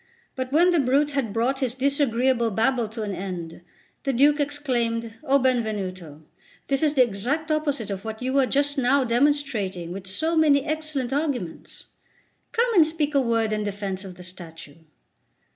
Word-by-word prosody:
But 260 0 -4
when 345 +5 +5
the 340 - +3
brute 280 +3 +2
had 275 -7 -1
brought 240 +5 0
his 255 -3 -1
disagreeable 260 -3 +1
babble 225 +2 +1
to 220 0 -5
an 205 -2 -3
end, 180 -4 -6 0.4
the 275 - 0
Duke 290 +4 +4
exclaimed: 240 -6 -1
"O 275 -2 +3
Benvenuto, 200 - -2 0.5
this 275 -1 +1
is 305 -1 +2
the 260 - +6
exact 250 +9 -2
opposite 290 -8 -1
of 195 0 -5
what 220 0 -6
you 255 +1 -2
were 270 -2 +3
just 285 +1 +1
now 265 +2 +3
demonstrating 235 - 0
with 190 +1 -7
so 315 - 0
many 295 -3 +4
excellent 310 -5 -2
arguments. 275 - -3 0.7
Come 470 +1 +1
and 335 -6 +6
speak 310 -2 -2
a 280 - +4
word 230 -3 +1
in 210 0 -1
defence 200 -1 -4
of 190 -2 -9
the 180 - -12
statue." 165 -4 -10
255 Hz, 170 wpm, -24 LUFS, 210-285 Hz, 0.7 s, the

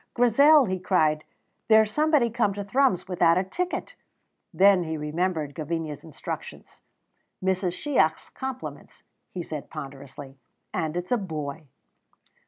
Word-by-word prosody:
"Grizel," 280 +5 +6
he 185 -3 -2
cried, 155 -5 +2 0.4
"there's 220 -1 +5
somebody 300 -6 +3
come 220 -4 +1
to 205 - -4
Thrums 250 -2 +1
without 175 -2 +3
a 185 - +2
ticket!" 360 - -4 0.6
Then 195 -1 +5
he 160 -1 -4
remembered 155 0 -2
Gavinia's 155 -2 -4
instructions. 160 -3 -8 0.6
"Mrs. 185 -1 0
Shiach's 170 - 0
compliments," 265 -1 -7 0.3
he 180 - -5
said 155 -3 -7
ponderously, 140 -2 -9 0.3
"and 160 +1 -2
it's 180 +4 -5
a 245 - +4
boy." 155 -6 -5
180 Hz, 125 wpm, -26 LUFS, 155-220 Hz, 0.6 s, Grizel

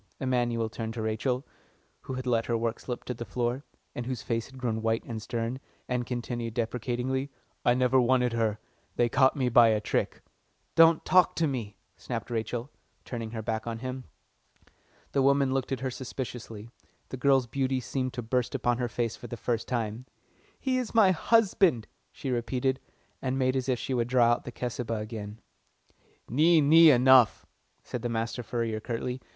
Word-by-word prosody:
Emanuel 120 -3 0
turned 115 0 -5
to 115 - -3
Rachel, 125 +4 -1 0.6
who 130 - -6
had 130 0 -5
let 115 -2 +1
her 115 - +1
work 115 0 -2
slip 125 -2 -5
to 125 - -4
the 120 - -6
floor, 120 +5 -2 0.3
and 120 0 -5
whose 130 -4 -4
face 115 -1 -2
had 135 - -14
grown 115 -3 -2
white 115 0 0
and 110 -2 -6
stern, 115 +3 -3 0.3
and 125 -1 -2
continued 120 -2 -4
deprecatingly, 125 +3 -2 0.3
"I 120 - +4
never 130 +1 +3
wanted 125 -1 +2
her. 110 -2 0 0.4
They 120 -1 +2
caught 130 +2 +4
me 130 -3 0
by 120 -1 +6
a 110 -1 +3
trick." 105 - -2 0.5
"Don't 165 -1 +5
talk 185 -1 +4
to 165 - +1
me," 120 -8 -4 0.2
snapped - - -5
Rachel, 120 +3 -3 0.3
turning 115 -3 -5
her 110 -1 -5
back 110 +1 -3
on 115 -1 -3
him. 130 +1 -6 1.1
The 140 - +2
woman 140 0 +3
looked 135 -1 -2
at 130 -2 -2
her 130 -1 -2
suspiciously 120 -3 -7 0.4
the - - -5
girl's 135 0 +3
beauty 130 +2 -1
seemed 130 +1 -3
to 125 -2 -4
burst 125 +3 -1
upon 120 -2 0
her 125 - 0
for 120 0 -3
the 120 - -6
first 115 -1 -2
time. 115 0 -3 0.5
"He 255 -1 0
is 240 -3 -5
my 205 -4 +6
husband," 190 - +3 0.3
she 135 - -5
repeated, 130 +2 0 0.4
and 130 0 -1
made 130 0 +1
as 130 0 -1
if 125 - +2
she 130 - -4
would 120 -2 0
draw 120 -2 +4
out 120 - 0
the 125 - -6
Cesubah 120 -1 -3
again. 105 0 -7 0.9
"Nee, 160 +7 +4
nee, 160 +3 +7
enough!" 130 -3 +5 0.4
said 125 - -5
the 120 - -2
master 115 +1 -2
furrier 115 -2 -2
curtly. 125 +3 -4
125 Hz, 180 wpm, -28 LUFS, 115-130 Hz, 1.1 s, nee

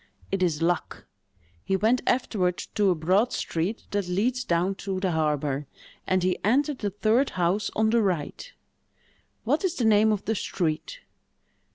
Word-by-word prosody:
"It 195 -1 -1
is 165 -3 +1
Luck. 175 0 -1 0.6
He 195 - 0
went 220 +6 +2
afterward 195 -8 +1 0.2
to 205 -2 +3
a 180 - +3
broad 185 +9 +2
street 175 +7 -2
that 200 -3 -1
leads 235 +8 0
down 175 +1 +1
to 195 -2 -3
the 185 -1 0
harbor, 150 -3 -1 0.4
and 185 -1 +2
he 185 0 0
entered 275 +6 +2
the 205 - -1
third 215 +7 +2
house 185 +4 +1
on 220 0 +2
the 235 0 +3
right——" 190 - -2 0.9
"What - - +1
is 365 -2 0
the 240 - 0
name 215 0 +5
of 205 -2 -2
the 220 - +1
street?" 185 - -3
195 Hz, 165 wpm, -26 LUFS, 175-220 Hz, 0.9 s, name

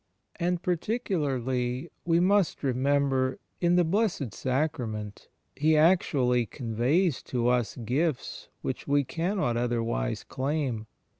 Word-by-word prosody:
And, 175 0 -1
particularly, 140 - -1
we 170 -1 +3
must 190 -1 +2
remember, 135 0 +1 0.2
in 175 0 +3
the 180 - +5
Blessed 170 - 0
Sacrament 125 -7 -2 0.3
He 155 +2 +3
actually 135 -8 +3
conveys 130 - 0
to 120 -1 0
us 125 -2 +1
gifts 130 +5 -2
which - - -4
we 145 0 +3
cannot 165 - -1
otherwise 115 - -1
claun. 130 -5 -2
140 Hz, 105 wpm, -28 LUFS, 125-170 Hz, 0.3 s, the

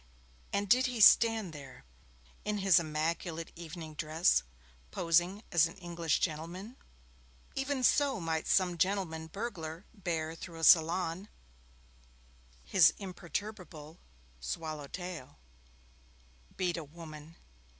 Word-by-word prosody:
And 200 0 -1
did 255 +5 +4
he 250 -2 -4
stand 220 -3 +6
there, 140 - -11 0.6
in 210 0 -1
his 195 -3 +5
immaculate 165 +1 -3
evening 165 -2 -8
dress, 155 - +2 0.5
posing 175 - +1
as 170 -3 +5
an 165 - -12
English 170 -3 -1
gentleman? 175 +8 -4 0.8
Even 270 -1 -2
so 275 -2 +3
might 160 -2 -2
some 180 -2 +2
gentleman 180 -4 0
burglar 175 -3 -6
bear 165 -6 -3
through 165 0 -9
a 165 - -7
salon 170 +3 +4 1.3
his 160 - +5
imperturbable 180 -4 -7 0.4
swallow 150 - -5
tail. 175 - -7 1.2
Beat 180 -2 0
a 165 - -4
woman! 155 0 -11
170 Hz, 110 wpm, -32 LUFS, 160-195 Hz, 1.3 s, stand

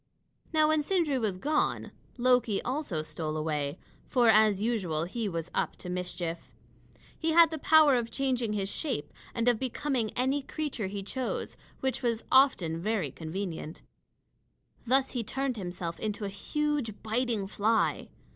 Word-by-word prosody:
Now 310 -1 +4
when 310 -1 +3
Sindri 305 -5 +1
was 210 -5 -1
gone, 300 +10 0 0.3
Loki 240 -4 +3
also 250 - -2
stole 155 0 -4
away; 150 -1 -2 0.3
for, 245 -3 +4
as 215 -2 +5
usual, 195 -9 0
he 210 +5 -3
was 165 -1 -4
up - - -1
to 180 - -8
mischief. 180 -2 -4 0.7
He 320 0 0
had 335 -1 +7
the 320 - -4
power 310 -1 +6
of 240 -2 +1
changing 250 -5 0
his 195 -2 -1
shape 205 - -3 0.2
and 230 0 0
of 240 -3 +4
becoming 260 -2 -1
any 265 +3 +1
creature 275 -7 -3
he 200 0 -5
chose, 255 +5 -3 0.3
which 265 0 -1
was 235 -3 0
often 190 - +4
very 200 - -1
convenient. 165 0 -5 1.0
Thus 265 +2 +3
he 245 -3 -2
turned 265 +3 -2
himself 175 -3 -5
into 210 -1 -3
a - - -2
huge 275 +2 -2
biting 225 -2 0
fly. 210 +3 +1
225 Hz, 150 wpm, -29 LUFS, 185-265 Hz, 1.0 s, had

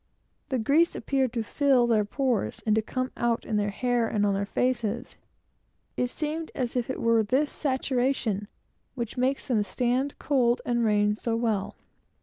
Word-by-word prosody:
The 260 - 0
grease 290 +9 +3
seemed - - -7
actually - - -14 0.2
coming 230 -2 -2
through 260 +1 +3
their 215 -3 +3
pores, 240 - -1
and 220 0 +3 0.4
out 235 -1 0
in 215 - -1
their 205 0 +1
hair, 245 +2 0
and 210 -2 +1
on 200 - +2
their 200 +1 -1
faces. 240 0 -1 0.8
It 250 - 0
seems 310 +4 -4
as 250 -2 -2
if 245 -1 -1
it 260 - -3
were 230 -1 +3
this 260 +7 +1
saturation 255 -6 -1 0.5
which 235 -4 -4
makes 260 +2 0
them 235 -6 +2
stand 250 +6 -1
cold 245 -4 +2
and 240 -1 +1
rain 210 -1 +2
so 230 0 -1
well. 225 -4 -1
240 Hz, 165 wpm, -27 LUFS, 215-260 Hz, 0.8 s, grease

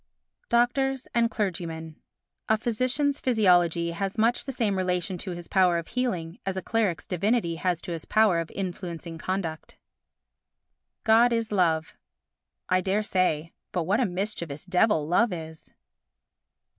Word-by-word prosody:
Doctors 265 +2 +1
and 235 -1 +3
Clergymen 165 -6 -3 0.5
A 220 - +4
physician's 255 +5 0
physiology 175 -8 +3
has 195 +4 -3
much 230 +2 +2
the 275 - -3
same 225 -6 0
relation 180 0 -1
to 190 - -5
his 175 -1 -6
power 185 -3 +3
of 170 - -5
healing 185 -10 -2
as 190 -1 -3
a - - -1
cleric's 210 -7 0
divinity 180 -2 0
has 175 -1 -1
to 180 - -5
his 165 -2 -5
power 215 -6 +3
of 165 - -4
influencing 175 -3 -5
conduct. 170 -4 -4 1.3
God 230 +2 +5
is 230 -2 -1
Love 165 -5 +1 0.7
I 185 0 +2
dare 195 +3 0
say. 170 -5 0 0.2
But 175 - -1
what 195 +7 +1
a 255 - +3
mischievous 175 -5 -4
devil 180 -4 +2
Love 215 +7 +3
is! 160 -2 -8
185 Hz, 145 wpm, -27 LUFS, 170-220 Hz, 1.3 s, God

